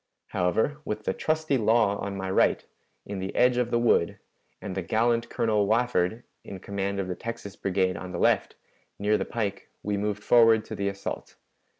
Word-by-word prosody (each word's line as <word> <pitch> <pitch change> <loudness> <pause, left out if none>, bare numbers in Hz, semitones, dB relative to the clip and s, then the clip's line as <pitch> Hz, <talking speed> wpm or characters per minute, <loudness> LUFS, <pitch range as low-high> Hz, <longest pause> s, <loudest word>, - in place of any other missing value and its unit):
However, 110 - 0
with 105 -4 -4
the - - +1
trusty 155 -1 0
Law 110 -2 +3
on 100 -1 -4
my 95 -1 -3
right, - - +2 0.4
in 100 -1 -5
the 95 +1 -5
edge 125 0 +4
of 125 -1 +1
the 120 - +2
wood, 120 -8 +2 0.4
and 95 - -6
the 95 - -2
gallant 115 +5 +1
Colonel 105 -3 +1
Wafford 115 -1 +1 0.2
in 95 - -8
command 100 0 -3
of 95 - -2
the 90 - -2
Texas 115 0 -7
Brigade 95 -1 0
on 90 +1 -7
the 90 - -4
left, - - +2 0.4
near 105 +1 +2
the 100 - -1
pike, 105 -4 -3
we 105 0 -1
moved 105 0 -2
forward 115 -2 +5
to - - -6
the 100 - -2
assault. 100 0 -6
105 Hz, 190 wpm, -27 LUFS, 95-115 Hz, 0.4 s, forward